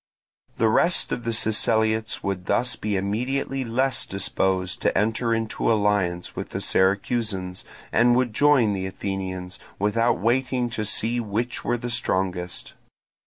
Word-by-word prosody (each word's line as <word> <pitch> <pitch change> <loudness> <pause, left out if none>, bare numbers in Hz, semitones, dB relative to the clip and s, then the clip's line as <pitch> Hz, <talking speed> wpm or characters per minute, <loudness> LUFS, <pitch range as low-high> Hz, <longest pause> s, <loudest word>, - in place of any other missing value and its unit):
The 115 - +3
rest 170 +10 +3
of 120 - -3
the 115 - 0
Siceliots 110 0 +1
would 95 -2 -3
thus 115 +3 +1
be 105 -1 -2
immediately 125 +7 -1
less 130 +3 0
disposed 95 -1 -1
to - - +1
enter 115 +2 +1
into 115 0 0
alliance 100 -5 0
with - - -5
the - - -4
Syracusans, 95 -1 0 0.3
and 120 +1 +4
would 125 -3 +1
join 135 -5 +4
the 95 -1 -2
Athenians, 95 -1 -5 0.2
without 115 +4 +2
waiting 125 +4 0
to 110 -2 -2
see 115 +3 0
which 115 +2 -3
were 120 - 0
the 120 0 -5
strongest. 95 -6 -2
110 Hz, 140 wpm, -24 LUFS, 95-120 Hz, 0.3 s, and